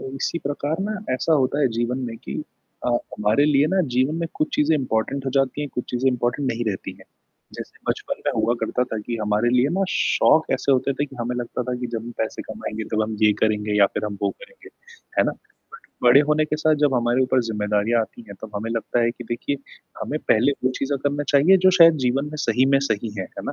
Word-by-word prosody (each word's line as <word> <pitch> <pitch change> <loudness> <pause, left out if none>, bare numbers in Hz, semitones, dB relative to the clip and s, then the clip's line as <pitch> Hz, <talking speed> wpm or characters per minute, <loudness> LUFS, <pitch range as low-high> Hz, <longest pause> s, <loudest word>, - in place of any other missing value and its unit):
इसी 165 +5 -2
प्रकार 145 +2 -2
ना, 210 +2 -2 0.2
ऐसा 130 +6 +1
होता 140 0 +2
है 135 - +4
जीवन 120 +2 0
में 115 - -6
कि - - -8 0.5
अ, - - +1
हमारे 115 +1 +1
लिए 145 0 +3
ना 190 - +4
जीवन 130 +5 +2
में 165 - -2
कुछ 155 - 0
चीज़ें 155 +2 +3
इम्पोर्टेन्ट 130 +1 -2
हो 135 - 0
जाती 135 +2 0
हैं, 145 - -4
कुछ 125 - -2
चीज़ें 125 +2 +2
इम्पोर्टेन्ट 125 +2 -1
नहीं 120 +1 -3
रहती 95 - -5
हैं। - - -16 0.5
जैसे - - -9
बचपन - - -3
में - - +3
हुआ 120 - +2
करता 125 - 0
था 120 -3 -5
कि 115 +3 -4
हमारे 105 +3 +1
लिए 125 +3 +3
ना, 195 - +2
शौक 160 - +3
ऐसे 135 +1 +1
होते 135 +1 +2
थे 145 +2 -1
कि 135 - -14
हमें 120 +1 -2
लगता 125 +1 -3
था 125 0 -3
कि, 125 - -3
जब 115 -1 -4
हम 120 - -6
पैसे 110 - -3
कमाएँगे, 110 0 -6
तब 110 - +2
हम 110 0 -4
ये 105 -1 +6
करेंगे 105 -1 0
या 100 - +8
फिर 105 - -2
हम 105 -1 -5
वो - - +2
करेंगे। - - -13 0.5
है - - +6
ना? - - +1 0.5
पर 125 - -2
बड़े 135 +4 +8
होने 155 0 +3
के 155 - -2
साथ, 155 0 +3
जब 140 -2 +2
हमारे 120 +1 +2
ऊपर 130 0 +2
ज़िम्मेदारियाँ 105 +2 +1
आती 115 +1 -6
हैं, 100 - -8
तब 110 - -7
हमें 110 +2 -4
लगता 115 +1 -1
है 115 - +2
कि 120 +1 -10
देखिए, 120 +4 -2 0.5
हमें - - -2
पहले 120 +6 +4
वो 130 - +3
चीज़ें 140 +1 -1
करना 145 +1 0
चाहिए, 155 +8 +6
जो - - +8
शायद 165 -1 +8
जीवन 135 +3 +1
में 150 +1 -7
सही 125 +3 +3
में - - +6
सही 110 +1 -1
हैं। 95 - -2
है - - -4
ना? - - -2
125 Hz, 240 wpm, -23 LUFS, 115-145 Hz, 0.5 s, या